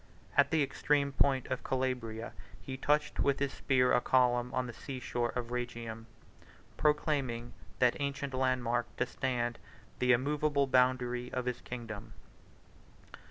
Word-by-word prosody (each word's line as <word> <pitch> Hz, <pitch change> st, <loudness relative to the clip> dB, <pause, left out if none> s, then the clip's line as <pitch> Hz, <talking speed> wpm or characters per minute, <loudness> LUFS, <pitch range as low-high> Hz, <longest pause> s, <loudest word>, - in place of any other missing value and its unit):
At 140 Hz, -1 st, +5 dB
the 160 Hz, -2 st, +3 dB
extreme 140 Hz, +1 st, +1 dB
point 135 Hz, -1 st, +2 dB
of 130 Hz, -, 0 dB
the -, -, -10 dB
Calabria, 125 Hz, -4 st, -2 dB, 0.3 s
he 130 Hz, -, -6 dB
touched 150 Hz, +3 st, +1 dB
with 140 Hz, -1 st, +3 dB
his 140 Hz, -1 st, -1 dB
spear 125 Hz, -2 st, +2 dB
a 125 Hz, -, +4 dB
column 125 Hz, -1 st, +3 dB
on 130 Hz, 0 st, 0 dB
the 120 Hz, -, -6 dB
sea 130 Hz, +3 st, -6 dB
shore 120 Hz, 0 st, -1 dB
of 120 Hz, -1 st, -3 dB
Rhegium, 115 Hz, -2 st, -4 dB, 0.3 s
32 -, -, -24 dB, 0.3 s
proclaiming 140 Hz, -6 st, 0 dB, 0.2 s
that 125 Hz, -1 st, +3 dB
ancient 140 Hz, -1 st, -2 dB
landmark 125 Hz, -2 st, 0 dB
to -, -, +2 dB
stand 120 Hz, -2 st, -2 dB, 0.4 s
the 125 Hz, 0 st, +4 dB
immovable 145 Hz, +3 st, +2 dB
boundary 125 Hz, -1 st, +2 dB
of 125 Hz, -1 st, -2 dB
his 125 Hz, -1 st, -2 dB
kingdom. 115 Hz, -4 st, -7 dB
125 Hz, 150 wpm, -32 LUFS, 120-135 Hz, 0.4 s, At